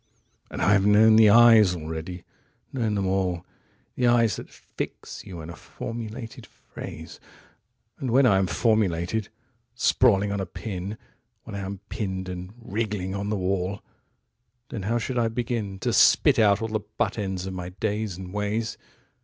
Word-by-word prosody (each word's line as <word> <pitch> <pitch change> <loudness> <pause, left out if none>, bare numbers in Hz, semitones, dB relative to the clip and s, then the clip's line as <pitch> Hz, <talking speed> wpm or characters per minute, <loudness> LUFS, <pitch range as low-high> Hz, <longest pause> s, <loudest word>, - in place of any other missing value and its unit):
55And - - -7
I 105 - +4
have 100 -1 +3
known 110 +1 +6
the 110 -1 +7
eyes 110 -4 +7
already, 80 +2 -6 0.5
known 115 -5 0
them 100 -1 0
all 95 -2 -1 0.5
56The 125 -1 +2
eyes 115 -5 +3
that - - -9
fix - - -7
you 90 -4 -7
in 80 +2 -8
a - - -9
formulated 115 0 -7
phrase,57And 110 - -11
when 130 +3 +4
I 100 -6 +5
am 95 - +1
formulated, 100 0 0 0.5
sprawling 105 -5 +3
on 100 - -2
a 95 - -3
pin,58When 100 +3 -9
I - - -3
am 100 0 -6
pinned 95 -2 -4
and 90 +1 -6
wriggling 105 -4 -3
on 100 +1 -3
the 105 - 0
wall,59Then 100 +5 -6
how 120 - +2
should 125 +2 -2
I 115 -1 +2
begin60To 115 -5 -2
spit - - +5
out 105 -1 +4
all 115 - -2
the 110 0 -1
butt 105 +2 -3
ends 95 -2 -3
of 95 - -5
my 90 -1 -5
days 105 0 -3
and 90 0 -8
ways? 105 +2 -2
105 Hz, 155 wpm, -25 LUFS, 95-115 Hz, 0.5 s, the